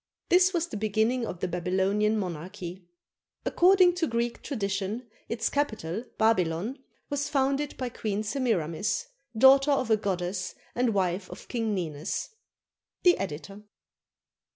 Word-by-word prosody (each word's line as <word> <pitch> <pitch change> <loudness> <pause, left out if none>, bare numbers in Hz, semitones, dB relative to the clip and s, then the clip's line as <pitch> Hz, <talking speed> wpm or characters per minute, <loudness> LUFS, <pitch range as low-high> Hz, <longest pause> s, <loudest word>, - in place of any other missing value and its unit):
This 365 +1 +5
was 340 -3 0
the 280 - -6
beginning 220 +3 +1
of 175 - -6
the - - 0
Babylonian 190 +5 +1
monarchy. 180 0 -5 0.6
According 365 0 +5
to 330 -3 +1
Greek 235 0 -1
tradition, 200 -1 -2 0.2
its 230 -1 0
capital, 220 - -2
Babylon, 215 - +1 0.3
was 285 0 -1
founded 275 +1 0
by 255 -2 -2
Queen 215 -2 -2
Semiramis, 210 - 0 0.3
daughter 270 +4 +7
of 260 -5 +2
a 220 - +6
goddess 185 -2 -2 0.2
and 240 -3 +1
wife 185 0 0
of 180 - -10
King 225 -4 -1
Ninus. 160 -2 -3 0.7
The 355 -1 +7
Editor. 195 +3 -5
215 Hz, 130 wpm, -28 LUFS, 185-260 Hz, 0.7 s, daughter